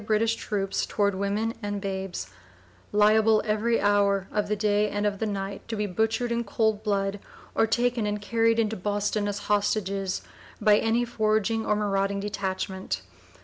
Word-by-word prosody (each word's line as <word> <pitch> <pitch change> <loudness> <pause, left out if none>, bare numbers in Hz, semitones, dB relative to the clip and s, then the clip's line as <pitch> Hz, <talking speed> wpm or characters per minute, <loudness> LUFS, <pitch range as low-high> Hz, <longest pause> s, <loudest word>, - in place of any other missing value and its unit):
003) 205 - -13
British 220 +1 +2
troops 195 -3 -2
toward 200 -1 +1
women 200 +4 -1
and 205 -1 -3
babes, 190 - -4 0.6
"liable 215 +1 +5
every 220 +2 +1
hour 200 -1 +2
of 210 -1 0
the 210 - 0
day 210 0 +2
and 205 0 -2
of 200 -1 0
the 220 - -1
night 195 -1 -4
to 230 - -3
be 210 -1 -1
butchered 225 +5 0
in 235 0 0
cold 220 0 0
blood, 200 -1 -1 0.3
or 225 - +3
taken 240 -1 +1
and 205 0 -1
carried 230 +2 +2
into 220 -1 +1
Boston 205 +1 -1
as 205 0 -2
hostages, 200 -2 0 0.4
by 210 -1 +5
any 230 +2 +1
foraging 220 -1 0
or 210 - +3
marauding 200 -1 0
detachment." 190 -1 -3
210 Hz, 165 wpm, -26 LUFS, 200-220 Hz, 0.6 s, liable